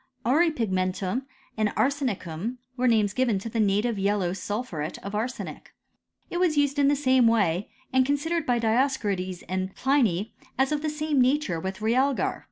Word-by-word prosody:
Auripigmentum 230 - +1 0.3
and 215 -1 +1
arsenicum 240 - -1 0.2
were 255 0 +1
names 215 -4 +3
given 245 -4 +1
to 200 +4 -5
the 225 - -3
native 210 +2 +1
yellow 195 -2 +1
sulphuret 195 -6 -4
of 200 - -6
arsenic. 215 - -5 0.6
It 350 - -1
was 345 -4 +2
used 285 0 +2
in 280 - +4
the 290 - +4
same 260 -3 +4
way, 200 -5 +2 0.2
and 260 0 +5
considered 295 +5 -1
by 245 -1 +3
Dioscorides 220 -6 0
and 185 +1 -3
Pliny 235 -7 +1 0.2
as 265 +2 +2
of 300 -1 0
the 310 - -1
same 300 -2 0
nature 255 - +1
with 190 +4 -5
realgar. 255 +5 +1
235 Hz, 160 wpm, -26 LUFS, 195-275 Hz, 0.6 s, and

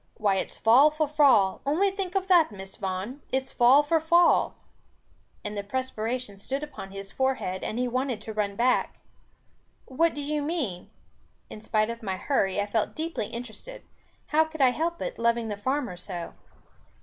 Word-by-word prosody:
Why 205 -4 +2
it's - - -3
fall 250 +7 +6
for 305 0 -1
fall, 275 -10 +4
only 345 +8 +2
think 385 -1 -5
of 385 -1 0
that, 345 -8 +5
Miss 195 -1 -9
Vaughan, 195 +9 -4
it's 265 0 -1
fall 260 +4 +5
for 320 +2 +2
fall!" 340 +2 +4 0.9
And 210 0 -5
the 205 - -2
perspiration 235 -1 -3
stood 270 +8 -3
upon 265 -10 -8
his 195 0 -8
forehead, 260 -8 -1
and 220 - -3
he 250 0 0
wanted 255 -1 -1
to 220 +1 -6
run 205 -2 -1
back. 250 +3 +1 0.9
"What 330 +5 +1
do 290 - -4
you 300 +1 -1
mean?" 285 - -3 0.6
In 215 - -9
spite 215 0 0
of 235 +1 -8
my 190 -4 -3
hurry, 195 -6 0
I 205 - +1
felt 210 +1 -1
deeply 320 -9 -3
interested. 245 - -8 0.5
How 310 +1 +4
could 315 0 -9
I 265 -2 +6
help 335 +5 -2
it, - - -5
loving 235 -1 +1
the 205 - -2
farmer 255 +1 -2
so? 175 -1 -7
250 Hz, 175 wpm, -27 LUFS, 205-300 Hz, 0.9 s, fall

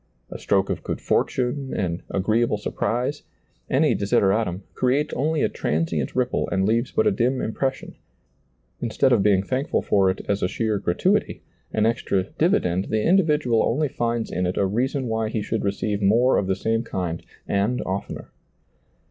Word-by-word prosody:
A - - -7
stroke 95 -1 +1
of - - -3
good - - -4
fortune, 130 +2 -1
an 90 -2 -2
<^reeable 110 +3 +1
surprise, 120 +7 -2 0.5
any 150 +3 +3
desideratum, 100 -1 +1
creates 135 +4 0
only 155 +3 0
a - - +4
transient 80 -3 -2
ripple 125 -1 0
and 95 -1 +1
leaves 115 +4 +1
but 220 - +1
a 210 - +4
dim 130 -5 +1
impression; 130 +4 -3 0.9
instead 120 +3 +1
of 120 -5 +4
being 95 -2 +3
thankful 130 +6 -1
for 95 -2 +3
it 95 - -2
as 100 0 0
a - - +2
sheer 110 +1 -1
gratuity, 90 -3 0 0.3
an 110 - +1
extra 110 -4 +1
divi 170 - +1
dend, 90 +2 -1
the 110 -1 -1
individual 150 -10 +3
only 145 +5 +1
finds 115 -2 -2
in 90 0 -1
it 90 - -3
a 100 - +2
reason 130 +7 -1
why 110 -2 -1
he 110 -1 -2
should 110 +1 -2
receive 100 +1 -1
more 115 +6 +4
of 95 - -2
the 95 - +1
same 115 +3 0
kind 90 -7 -4 0.3
and 100 +5 0
oftener. 95 +1 -5
110 Hz, 170 wpm, -23 LUFS, 95-130 Hz, 0.9 s, a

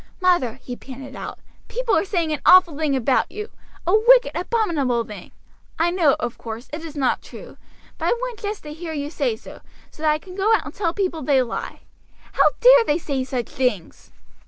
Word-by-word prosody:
"Mother," 350 - +2
he 250 - -6
panted 270 +1 -10
out, - - -7 0.3
"people - - 0
are - - +2
saying 340 -5 -1
an 300 - -4
awful 360 -4 +7
thing 300 -2 0
about 260 0 +1
you, 425 +2 -7 0.3
a 355 - +1
wicked, 485 +3 +6
abominable 330 - 0
thing. 210 -5 -10 0.5
I 335 +2 +2
know, 335 -6 +3
of 240 -1 -4
course, 230 +2 -7
it 315 +2 -5
is 315 -2 -8
not 270 -3 0
true, - - -12 0.4
but - - -3
I - - +3
want 485 -2 -5
just 415 0 -5
to 300 -1 -7
hear 325 0 -6
you 290 -1 -4
say 470 +5 -1
so, - - -13 0.3
so - - -16
that 310 - +2
I 300 - +1
can 365 +4 -13
go 410 +3 +3
out - - -2
and - - -8
tell 345 -5 -1
people 360 -4 -2
they 265 -1 +3
lie. 235 - -6 0.5
How - - +4
dare - - +8
they 295 -8 +1
say 280 -6 -2
such 255 -2 -4
things!" 245 -10 -3
320 Hz, 205 wpm, -22 LUFS, 265-395 Hz, 0.5 s, dare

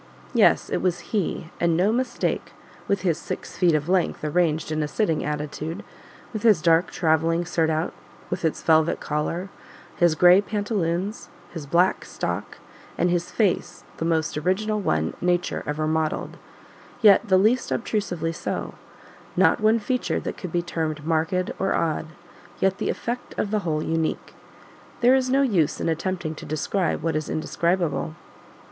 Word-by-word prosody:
Yes, - - +4
it - - +1
was 180 -2 0
HE, 180 -4 -1
and 170 -1 +2
no 190 +4 +3
mistake, 250 +3 -1 0.3
with 200 -1 +1
his 170 -3 +1
six - - -6
feet 175 -3 +3
of 150 +1 -1
length 180 -3 +1
arranged 155 0 +1
in 155 0 0
a 150 - 0
sitting 165 -1 0
attitude; 150 +4 -4 0.5
with 215 - -3
his 215 -6 +5
dark 165 +2 +3
travelling 165 +1 +1
surtout 160 -1 0 0.4
with - - -3
its 160 - -1
velvet 160 0 +3
collar, 165 +5 -2 0.5
his 175 -2 +4
gray 180 +3 +7
pantaloons, 205 -1 -2 0.2
his 160 -5 -7
black 175 +5 +2
stock, - - -4 0.4
and 175 - +2
his 175 0 0
face, 175 -4 0
the - - -3
most 160 -1 0
original 210 +6 0
one 80 - 0
Nature 175 0 0
ever 150 +1 -1
modelled, 155 0 -1 0.7
yet 210 +2 +6
the 190 -2 +5
least 225 +6 +2
obtrusively 180 -8 -1
so; - - -4 0.6
not - - +4
one 215 +1 +4
feature 250 +3 -1
that - - -5
could 180 - -7
be 175 +1 0
termed 155 -3 -3
marked 165 +3 0
or 195 - +1
odd, 160 -1 -1 0.5
yet 190 +1 +1
the - - -1
effect 245 +1 -4
of 205 - -1
the 215 - +2
whole 155 -5 -1
unique. 160 0 -2 0.7
There 245 +2 +6
is 260 -1 +2
no 270 +2 +3
use 180 - +1
in - - -1
attempting 165 0 -2
to - - -8
describe 155 +3 -1
what 165 -2 0
is 155 0 -2
indescribable. 160 - -1
170 Hz, 160 wpm, -24 LUFS, 160-195 Hz, 0.7 s, gray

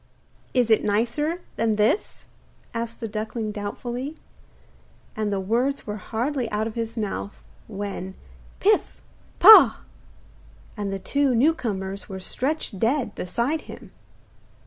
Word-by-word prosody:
'Is 245 -3 +3
it 220 - +4
nicer 240 +11 0 0.2
than 225 -1 +1
this?' 215 - 0 0.5
asked 230 0 -4
the 225 - -2
duckling 215 +1 -4
doubtfully. 240 +7 -5 1.0
And 215 -1 -1
the 200 - 0
words 240 +8 0
were 210 -1 -4
hardly 240 +4 -2
out 210 +1 -1
of 225 - -4
his 230 0 -4
mouth, 205 -1 -3 0.3
when 195 -2 -5 0.4
'Pif! - - +2 0.4
pah!' - - +9 0.9
and 205 -1 -3
the 195 - -2
two 275 +6 +1
new 290 +8 +4
comers 195 -8 -4
were 190 -1 -6
stretched 250 +2 -3
dead 235 -1 +1
beside 240 - -2
him. - - -10
225 Hz, 125 wpm, -24 LUFS, 205-250 Hz, 1.0 s, pah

